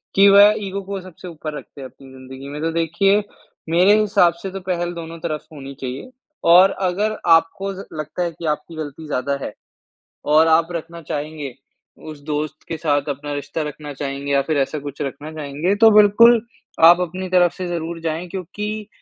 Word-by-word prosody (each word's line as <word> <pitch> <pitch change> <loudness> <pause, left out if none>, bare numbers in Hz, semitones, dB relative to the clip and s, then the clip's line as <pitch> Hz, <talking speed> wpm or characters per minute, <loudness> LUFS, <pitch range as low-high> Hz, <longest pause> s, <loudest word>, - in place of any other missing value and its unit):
कि 200 +1 +7
वह 205 +1 +8
ईगो 195 +1 -4
को 195 0 -5
सबसे 180 0 -12
ऊपर 155 -2 -6
रखते 140 - -12
हैं 130 - -6
अपनी 135 0 -17
ज़िन्दगी 130 +1 -11
में। 150 +1 -6
तो 165 0 -1
देखिए 195 +5 +2 0.5
मेरे 190 +6 +5
हिसाब 195 -5 +3
से 195 - -5
तो 195 - -6
पहल 175 -1 -1
दोनों 165 0 -8
तरफ 155 -2 -4
होनी 140 -1 -9
चाहिए 130 - -6 0.4
और 185 +2 +7 0.2
अगर 210 +4 -1
आपको 165 +4 +3
ज 195 +1 -8
लगता 155 +3 -4
है 170 - -2
कि 165 +1 -9
आपकी 155 +2 -3
गलती 155 0 -7
ज़्यादा 140 0 -1
है - - -5 0.8
और 160 +1 +6
आप 160 +1 +4
रखना 170 0 -6
चाहेंगे 150 -3 -5 0.6
उस 150 -2 -9
दोस्त 150 0 -4
के 165 - -4
साथ 145 -2 0
अपना 145 +1 -4
रिश्ता 145 +2 -4
रखना 150 0 -8
चाहेंगे 140 0 -4
या 140 0 +3
फिर 155 -2 0
ऐसा 140 +2 -1
कुछ 145 +1 -8
रखना 145 +2 -5
चाहेंगे, 155 +6 -2
तो 220 +1 +6
बिल्कुल 215 +3 +6 0.4
आप 175 +1 +8
अपनी 185 +2 -4
तरफ 180 -2 +4
से 185 -2 -5
ज़रूर 170 -1 -4
जाएँ, 165 +2 -3
क्योंकि 210 +3 -5
165 Hz, 190 wpm, -20 LUFS, 145-185 Hz, 0.8 s, वह